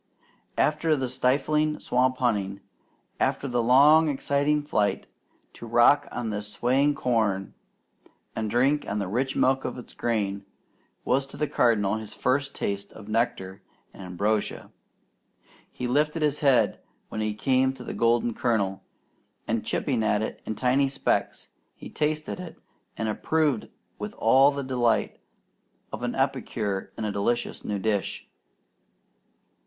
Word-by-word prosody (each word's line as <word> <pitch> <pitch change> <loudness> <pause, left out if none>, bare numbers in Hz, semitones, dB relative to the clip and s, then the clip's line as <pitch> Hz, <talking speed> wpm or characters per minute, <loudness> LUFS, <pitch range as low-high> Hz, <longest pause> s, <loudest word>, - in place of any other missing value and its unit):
After 155 +1 +2
the 130 -2 -2
stifling 150 +5 +1
swamp 130 +1 +1
hunting, 100 -6 -1 0.6
after 140 - 0
the 120 -2 0
long 145 +6 +6
exciting 145 +1 +1
flight, 105 -9 0 0.5
to 120 - -10
rock 120 +5 +4
on 120 -3 -3
this 105 0 -4
swaying 135 +7 +2
corn 110 -7 0 0.8
and 110 -1 -2
drink 135 +6 +2
the 100 -1 -3
rich 130 +7 -1
milk 130 +1 +2
of - - -4
the 125 - -10
grain, 100 -4 -1 0.6
was 135 +2 +1
to 145 - -12
the 150 - 0
Cardinal 110 -5 +2
his 110 -1 -8
first 140 +2 0
taste 100 0 -3
of 105 -2 -12
nectar 100 -4 -1 0.3
and - - -12
ambrosia. 100 +4 -2 1.0
He 125 - -4
lifted 150 +5 +1
his 150 -1 +1
head 135 -4 +3 0.3
when 110 - -4
he 110 -1 -1
came 130 +3 +2
to 130 -2 -10
the - - -6
golden 115 0 +2
kernel, 100 -5 0 0.7
and 110 -1 -1
chipping 130 -6 -1
it 110 0 -1
in 110 - -2
tiny 130 +3 +2
specks, 135 - -1 0.3
he - - -11
tasted 155 +3 -3 0.4
and 110 - -2
approved 145 +2 0 0.3
with - - -6
all 135 +5 +5
the 140 -1 -3
delight 125 -3 0 0.7
of - - -5
an - - -2
epicure 100 -3 -2
in 110 - -3
a 105 - -1
delicious 100 +4 -1
new 105 - -2
dish. 100 -1 -2
120 Hz, 140 wpm, -26 LUFS, 105-140 Hz, 1.0 s, long